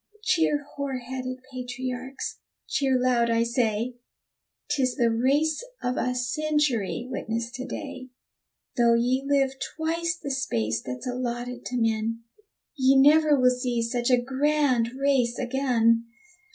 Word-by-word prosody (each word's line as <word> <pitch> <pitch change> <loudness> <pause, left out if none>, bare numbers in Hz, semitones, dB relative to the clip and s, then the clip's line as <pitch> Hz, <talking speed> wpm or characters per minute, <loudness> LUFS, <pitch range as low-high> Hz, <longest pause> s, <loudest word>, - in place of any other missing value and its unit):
Cheer, 320 -7 +2
hoar 280 -2 -4
headed 255 +1 -6
patriarchs; 255 +1 -5 0.3
cheer 265 -2 +1
loud, 245 -2 +2
I 230 0 +3
say. 235 0 -1 0.7
'Tis 260 -4 0
the 235 -4 +2
race 285 - +1 0.2
of 250 0 0
a 250 0 -1
century 250 -3 0
witnessed 230 -2 -3
to 255 - -5
day! 265 -2 -7 0.7
Though 235 -1 +5
ye 250 +3 +1
live 275 -1 +2 0.3
twice 335 +2 -1
the 280 - -5
space 115 - -1
that's 125 0 -6
allotted 245 0 -4
to 250 - -3
men, 225 0 0 0.5
Ye 265 -1 +4
never 300 +1 +6
will 250 0 +5
see 250 -2 -1
such 240 +1 -1
a 250 -1 +5
grand 270 -1 +1
race 265 -4 +2
again. 240 -3 +2
255 Hz, 130 wpm, -26 LUFS, 235-275 Hz, 0.7 s, never